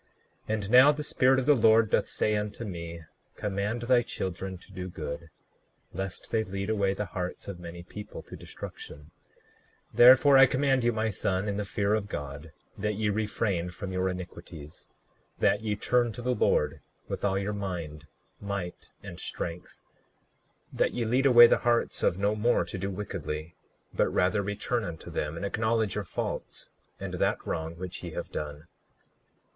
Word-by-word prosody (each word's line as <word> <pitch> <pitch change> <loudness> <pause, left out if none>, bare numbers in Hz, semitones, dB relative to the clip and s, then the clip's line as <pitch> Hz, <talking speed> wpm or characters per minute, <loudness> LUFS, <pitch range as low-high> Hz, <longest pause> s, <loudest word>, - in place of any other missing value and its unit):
39:12 - - +1
And 105 -2 -4
now 130 +4 +9
the 150 0 -4
Spirit 130 -2 +3
of 130 - 0
the 150 - +6
Lord 110 -2 +5
doth - - +2
say 105 - 0
unto 105 +2 -3
me: 85 -3 -6 0.3
Command 105 +3 -2
thy 125 0 +4
children 95 -3 -4
to 90 - -17
do 90 0 -5
good, 75 -1 -6 0.6
lest 95 0 -5
they 110 -1 +2
lead 100 +1 -3
away 100 -2 +1
the 105 - -2
hearts 90 -1 -5
of 100 -3 -6
many 85 0 -8
people 105 +4 -9
to - - -10
destruction; 75 +2 -10 0.8
therefore 130 +3 +8
I 135 - +9
command 135 -1 +2
you, 120 - +3
my 110 -1 -1
son, 95 +1 -1
in 100 -1 -1
the 105 - -1
fear 100 +1 0
of 110 -2 0
God, 70 +2 -6 0.3
that 105 +1 -1
ye 105 0 0
refrain 100 -4 -1
from 95 +2 -6
your 95 0 0
iniquities; 85 -4 -8 0.5
39:13 - - -32
That 105 - +3
ye 105 -2 -1
turn 120 +2 +1
to 120 - -8
the 125 +1 +1
Lord 115 - +1 0.3
with - - -5
all 95 -1 +2
your 100 +2 -2
mind, 85 -7 -5 0.3
might, 100 -3 -5
and - - -8
strength; 85 +1 -6 0.9
that - - +1
ye 120 -1 0
lead 130 +5 +3
away 120 -2 +10
the - - +4
hearts 120 -1 +1
of 85 - +2
no 100 +2 +1
more 110 -4 +2
to 90 +2 -6
do 95 +2 -2
wickedly; 85 -5 -5 0.4
but - - +2
rather 100 +3 +2
return 105 +4 -2
unto 85 -4 -7
them, 75 +2 -3
and 90 - -3
acknowledge 110 0 0
your 105 - -2
faults - - -5 0.3
and - - -5
that - - 0
wrong 80 +1 -3
which 90 +1 -7
ye - - -6
have - - -5
done. 75 0 -5
100 Hz, 180 wpm, -28 LUFS, 90-110 Hz, 0.9 s, away